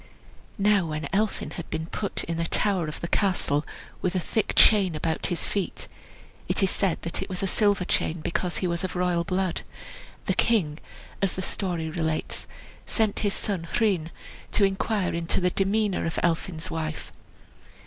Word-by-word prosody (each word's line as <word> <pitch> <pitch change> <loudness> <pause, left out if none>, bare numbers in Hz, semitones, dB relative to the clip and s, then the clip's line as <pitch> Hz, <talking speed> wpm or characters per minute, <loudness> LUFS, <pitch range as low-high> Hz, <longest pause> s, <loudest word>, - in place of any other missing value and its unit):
Now 200 -3 +3
when 155 -1 -3
Elphin 210 +2 0
had 170 - -7
been 160 0 -2
put 200 +4 -3
in 165 0 -3
a 165 - +1
tower 190 -4 +2
of 150 - -6
the 170 - -2
castle, 175 -7 +1 0.4
with 185 0 0
a - - +3
thick 210 +4 0
chain 195 -6 +6
about 160 +1 0
his 175 -3 -1
feet 200 -3 -3 0.6
(it - - +1
is 190 - +3
said 190 -4 +1
that 170 - -2
it - - -4
was 185 0 -3
a - - +2
silver 200 -1 +2
chain, 165 -1 0
because 175 +3 -1
he 185 - 0
was 170 0 -2
of 185 -2 -3
royal 180 -1 +1
blood), 185 +1 0 0.6
the - - +1
king, 175 -10 +2 0.4
as 195 -2 +2
the 185 - -3
story 175 -5 -1
relates, 160 -1 -2 0.4
sent 220 -3 +1
his 205 -2 +1
son 180 -5 -1
Rhun 190 -8 +2 0.4
to 210 - +4
inquire 195 0 +1
into 170 0 0
the 180 -1 +2
demeanor 200 -1 +1
of 160 - -3
Elphin's 170 +1 0
wife. 155 -1 -4
180 Hz, 175 wpm, -26 LUFS, 165-195 Hz, 0.6 s, chain